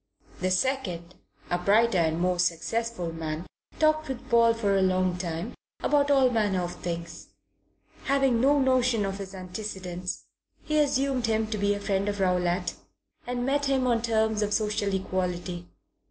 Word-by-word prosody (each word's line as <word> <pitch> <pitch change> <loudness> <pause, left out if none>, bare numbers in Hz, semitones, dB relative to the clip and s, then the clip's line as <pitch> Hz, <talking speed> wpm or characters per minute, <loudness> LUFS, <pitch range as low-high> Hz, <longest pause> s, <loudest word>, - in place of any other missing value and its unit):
The 185 - 0
second, 185 -5 -1 0.4
a 175 - +1
brighter 210 +1 +3
and 160 0 +1
more 180 0 +1
successful 180 +2 -1
man, 160 +1 -4 0.3
talked 310 0 +2
with 255 -1 -6
Paul 230 -1 +5
for 205 -3 +1
a 195 - +3
long 185 -1 +2
time 175 +4 -4 0.3
about 290 -1 +3
all 270 -3 +4
manner 205 -5 +1
of 175 - -4
things. 170 -1 -6 0.8
Having 270 -4 +2
no 285 +3 +4
notion 255 -5 +2
of 195 +1 -4
his 195 -1 -7
antecedents, 185 -1 -5 0.4
he 305 0 +1
assumed 275 -4 +1
him 220 0 +1
to 215 - -1
be 205 0 +2
a - - -5
friend 200 0 0
of 205 0 -3
Rowlatt 180 -1 +1 0.5
and 245 0 -2
met 285 +2 +1
him 270 -2 +1
on 235 -2 +2
terms 220 -2 +1
of 210 0 +1
social 210 -2 0
equality. 180 -2 -3
205 Hz, 160 wpm, -27 LUFS, 180-245 Hz, 0.8 s, Paul